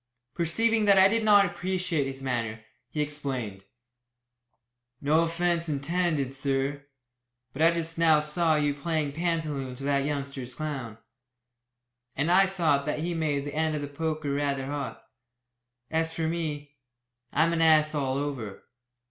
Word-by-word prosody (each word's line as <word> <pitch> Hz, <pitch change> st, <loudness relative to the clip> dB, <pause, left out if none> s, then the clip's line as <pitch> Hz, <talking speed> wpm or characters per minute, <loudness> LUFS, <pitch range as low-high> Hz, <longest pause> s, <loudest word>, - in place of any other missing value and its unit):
Perceiving 220 Hz, +8 st, +1 dB
that 200 Hz, -1 st, +6 dB
I 190 Hz, 0 st, +8 dB
did 225 Hz, +3 st, +1 dB
not 205 Hz, -2 st, +6 dB
appreciate 180 Hz, -5 st, -1 dB
his 135 Hz, 0 st, -7 dB
manner, 115 Hz, -4 st, -3 dB, 0.2 s
he 150 Hz, +3 st, -1 dB
explained. 130 Hz, -10 st, -5 dB, 1.3 s
"No 150 Hz, +3 st, +3 dB
offence 170 Hz, 0 st, 0 dB
intended, 150 Hz, -1 st, 0 dB
sir. 140 Hz, +1 st, -2 dB, 0.7 s
But 140 Hz, -, -5 dB
I 165 Hz, -, +7 dB
just 165 Hz, -1 st, -3 dB
now 160 Hz, -2 st, +5 dB
saw 155 Hz, +2 st, +1 dB
you 145 Hz, -1 st, +1 dB
playing 150 Hz, 0 st, -2 dB
pantaloon 155 Hz, -5 st, -2 dB
to 135 Hz, -, -9 dB
that 140 Hz, 0 st, +1 dB
youngster's 140 Hz, -3 st, -4 dB
clown, 135 Hz, -8 st, -5 dB, 1.2 s
and 150 Hz, +5 st, +1 dB
I 190 Hz, +2 st, +6 dB
thought 160 Hz, -7 st, +1 dB
that 150 Hz, -, -1 dB
he 175 Hz, +2 st, -2 dB
made 150 Hz, -4 st, -1 dB
the 145 Hz, -, -5 dB
end 155 Hz, 0 st, 0 dB
of 145 Hz, -, -3 dB
the -, -, -3 dB
poker 155 Hz, 0 st, -3 dB
rather 140 Hz, -2 st, -1 dB
hot. 140 Hz, -1 st, -5 dB, 0.9 s
As 160 Hz, 0 st, 0 dB
for 165 Hz, -, -2 dB
me, 150 Hz, -3 st, -4 dB, 0.5 s
I'm 165 Hz, +3 st, +2 dB
an 165 Hz, -, +1 dB
ass 155 Hz, -1 st, +5 dB
all 135 Hz, -3 st, -1 dB
over. 135 Hz, -8 st, -4 dB
150 Hz, 150 wpm, -27 LUFS, 140-165 Hz, 1.3 s, I